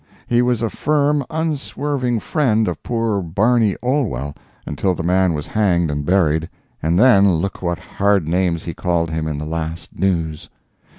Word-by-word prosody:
He 120 0 +2
was 125 -2 +1
a 115 - +1
firm, 145 -1 +1
unswerving 145 -6 -2
friend 110 -8 +1
of - - -3
poor 115 -4 -1
Barney 105 +5 +2
Olwell 110 - -1 0.3
until 90 +6 -1
the 80 - -4
man 90 0 +2
was 75 -1 -4
hanged 90 -7 +1
and 75 0 -2
buried, 80 -2 +1 0.3
and 80 +2 +1
then 100 -5 +6
look 95 +5 -3
what 85 -2 -1
hard 100 -5 0
names 85 -1 0
he 85 - -5
called 85 -1 -1
him 80 0 -2
in 75 -2 -3
the 75 - -4
last 80 +1 -5
News. 85 -5 -1
95 Hz, 165 wpm, -19 LUFS, 80-120 Hz, 0.3 s, then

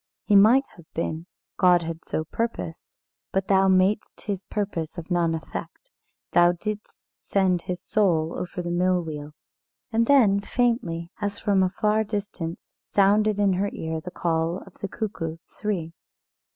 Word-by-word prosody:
He 210 - +3
might 225 +7 +7
have 170 -2 -17
been, 165 +1 -3 0.3
God 180 -2 +5
had 165 0 -5
so 155 - -2
purposed; 195 -2 -4 0.3
but 190 0 0
thou 195 -1 +4
madest 190 +3 +2
His 200 -3 -4
purpose 185 -6 -3
of 170 +2 -7
none 170 -2 +2
effect. - - -8 0.4
Thou 175 0 +5
didst 210 +4 -6 0.2
send 185 -3 +1
his 180 0 -5
soul 170 -6 +2
over 180 0 -4
the 175 - -3
mill 180 0 +2
wheel." 150 -2 -6 0.6
And 230 0 +2
then 225 -9 +5
faintly, 200 -8 -1
as 205 -1 -2
from 200 -2 +2
a 185 - +3
far 210 +3 +1
distance, 200 -5 -5
sounded 205 +1 +3
in 200 -2 +3
her 195 +3 0
ear 160 0 -3
the 180 - -7
call 165 0 -1
of 195 - -15
the 200 - -3
cuckoo 185 -6 -4 0.2
three. 180 -7 -2
185 Hz, 155 wpm, -25 LUFS, 170-205 Hz, 0.6 s, might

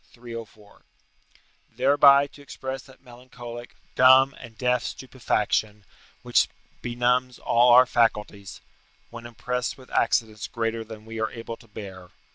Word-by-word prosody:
304.] 115 -3 -11 0.9
thereby 140 +2 +5
to 145 0 -15
express 135 -1 -7
that 130 0 -19
melancholic, 120 -1 -11 0.2
dumb, 130 +1 +6
and 115 -3 -13
deaf 125 -1 +1
stupefaction, 105 -5 -2 0.4
which - - +3 0.3
benumbs 125 +1 0
all 120 +1 +3
our 125 +1 +8
faculties, 105 -5 -1 0.5
when 120 0 -9
oppressed 120 +2 -4
with 130 -1 -16
accidents 110 -2 0
greater 115 -1 -3
than 110 -1 -11
we 115 0 -7
are 110 - 0
able 115 0 -7
to 115 - -20
bear. 95 -4 -10
120 Hz, 125 wpm, -25 LUFS, 110-125 Hz, 0.9 s, our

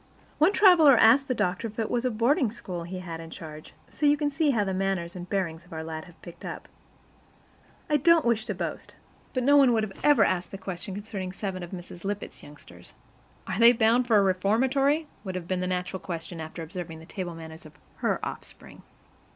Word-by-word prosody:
One 315 +6 +5
traveler 345 - +7
asked 260 +6 +6
the 255 - 0
doctor 180 +4 -1
if 215 - -12
it 225 -2 -2
was 245 +1 0
a - - +3
boarding 245 +4 +2
school 180 -6 -7
he 185 +2 -6
had 165 -3 -7
in 165 0 -9
charge; 155 -2 -10
so 295 - -1
you 290 +1 +4
can 290 -1 -1
see 310 +1 +1
how 230 -6 +2
the 190 -1 -2
manners 185 -2 -2
and 180 0 -8
bearing 185 -5 -1
of 175 +2 -20
our 160 -1 -5
lads 160 +1 -6
have 175 - -18
picked 170 - -12
up. - - -7 1.2
I 300 - +3
don't 330 +1 +4
wish 230 -2 +1
to - - -3
boast, - - -5 0.4
but 255 - 0
no 285 +3 +5
one 265 -4 +6
would 215 -3 -1
ever 290 -8 +5
have 185 - +2
asked 175 - -11
such 195 - -8
a - - -21
question 190 0 -5
concerning 200 -3 -5
seven 190 -1 -5
of 175 - -7
Mrs. 175 -1 -9
Lippett's 205 +1 -5
youngsters. 145 0 -15 0.5
"Are 195 - -3
they 235 +1 +8
bound 235 +2 +3
for 225 -3 +5
a 200 - +5
reformatory?" 260 - +2 0.2
would 190 -3 -5
have 175 -2 -5
been 185 0 -1
the 180 - -2
natural 180 +1 -3
question 165 -1 -6
after 160 +1 -7
observing 165 -1 -7
the 160 - -12
table 175 -1 -6
manners 160 -1 -10
of 155 - -19 0.2
her - - 0
offspring. - - -9
195 Hz, 220 wpm, -27 LUFS, 175-245 Hz, 1.2 s, they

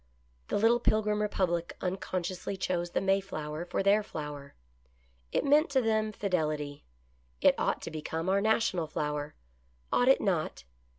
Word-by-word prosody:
The - - 0
little 230 +3 +4
Pilgrim 210 -2 +1
republic 180 -5 -1
unconsciously 185 0 -3
chose 175 -2 -1
the - - -1
Mayflower 185 -5 -1
for 180 - -1
their 200 +2 +5
flower; 150 -7 -7 0.8
it - - 0
meant 295 +3 +4
to 275 -1 +3
them 220 -2 +1
Fidelity. 155 -8 -2 0.6
It - - +6
ought - - 0
to - - -5
become 160 +2 -4
our 195 +1 +3
national 215 -6 +1
flower. 150 0 -3 0.6
Ought 245 - +3
it 270 - +6
not? 170 - -1
185 Hz, 140 wpm, -30 LUFS, 155-210 Hz, 0.8 s, It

